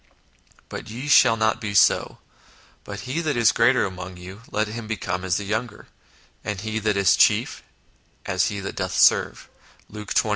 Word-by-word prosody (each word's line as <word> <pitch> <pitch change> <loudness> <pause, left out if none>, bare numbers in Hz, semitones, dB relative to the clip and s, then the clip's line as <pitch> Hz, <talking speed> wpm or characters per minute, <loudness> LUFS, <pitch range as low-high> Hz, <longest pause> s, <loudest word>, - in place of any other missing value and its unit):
But - - -8
ye 125 +6 -7
shall 115 -5 +5
not 110 0 0
be 105 -2 -4
so: - - +3 0.7
but 105 0 -8
he 130 +10 -3
that 155 -6 -2
is 115 -2 +5
the - - +1
greater - - +3
among 90 -1 -7
you, 95 +4 -11
let 110 0 -1
him 110 +1 -7
become 95 -4 -4
as 95 -2 0
the 105 - -4
younger; 110 +2 -4 0.5
and 105 -2 -4
he 110 +1 -3
that 105 -1 0
is 100 -2 +4
chief, - - +2 0.6
as 95 -1 0
he 100 - -4
that 95 - -6
doth - - -3
serve" - - +3 0.4
(Luke 105 -1 -9
xxii. 110 - +2
105 Hz, 185 wpm, -23 LUFS, 95-110 Hz, 0.7 s, shall